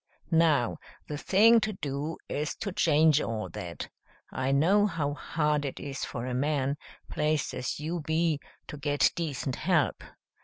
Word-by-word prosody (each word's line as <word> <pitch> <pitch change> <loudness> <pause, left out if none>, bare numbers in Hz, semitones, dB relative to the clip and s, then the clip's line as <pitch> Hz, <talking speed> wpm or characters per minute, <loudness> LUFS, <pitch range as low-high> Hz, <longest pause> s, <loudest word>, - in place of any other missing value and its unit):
Now, 160 -7 +3 0.3
the 150 - -4
thing 225 +7 +6
to 215 -1 -2
do 150 -2 -4
is 150 +1 -2
to 200 - -4
change 155 -3 +4
all 110 -4 -3
that. 85 +1 -6 0.4
I 130 +1 -1
know 190 +9 +4
how 155 -6 -2
hard 150 +1 0
it 140 - -4
is 140 -2 -4
for 120 0 -5
a 130 - -3
man, 140 +1 0 0.3
placed 150 -1 0
as 130 - -3
you 165 +3 -3
be, 160 0 0 0.3
to 150 - -8
get 145 0 +2
decent 140 -6 -3
help. 170 -4 +1
150 Hz, 155 wpm, -29 LUFS, 140-165 Hz, 0.4 s, thing